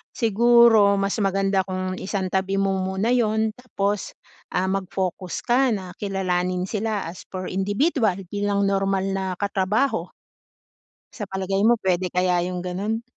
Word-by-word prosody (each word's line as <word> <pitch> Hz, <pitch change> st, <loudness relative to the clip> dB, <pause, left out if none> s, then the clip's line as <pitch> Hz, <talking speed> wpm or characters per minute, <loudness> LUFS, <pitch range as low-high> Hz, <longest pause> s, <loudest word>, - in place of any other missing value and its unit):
siguro 230 Hz, -2 st, +5 dB
mas 195 Hz, +2 st, -1 dB
maganda 195 Hz, 0 st, +1 dB
kung 185 Hz, 0 st, -3 dB
isang 190 Hz, -1 st, -2 dB
tabi 190 Hz, 0 st, 0 dB
mo 195 Hz, -1 st, +1 dB
muna 190 Hz, +4 st, -1 dB
'yon 220 Hz, -3 st, +2 dB
tapos, 205 Hz, -5 st, -2 dB, 0.4 s
ah, 180 Hz, +1 st, +1 dB
mag 195 Hz, 0 st, -1 dB
focus 185 Hz, -1 st, -3 dB
ka 255 Hz, +2 st, +3 dB
na 185 Hz, -3 st, -7 dB
kilalanin 185 Hz, -2 st, -1 dB
sila 210 Hz, -5 st, -2 dB
as 180 Hz, -, -11 dB
for 185 Hz, -1 st, -5 dB
individual 205 Hz, -, +1 dB, 0.2 s
bilang 205 Hz, 0 st, 0 dB
normal 195 Hz, -1 st, +1 dB
na 195 Hz, 0 st, -2 dB
katrabaho. 200 Hz, +1 st, 0 dB, 1.1 s
Sa 215 Hz, -, -5 dB
palagay 195 Hz, 0 st, -2 dB
mo 235 Hz, +1 st, +5 dB
puwede 185 Hz, -1 st, +1 dB
kaya 180 Hz, -1 st, +2 dB
yung 180 Hz, -1 st, -4 dB
gano'n? 205 Hz, +6 st, -2 dB
195 Hz, 140 wpm, -23 LUFS, 185-215 Hz, 1.1 s, siguro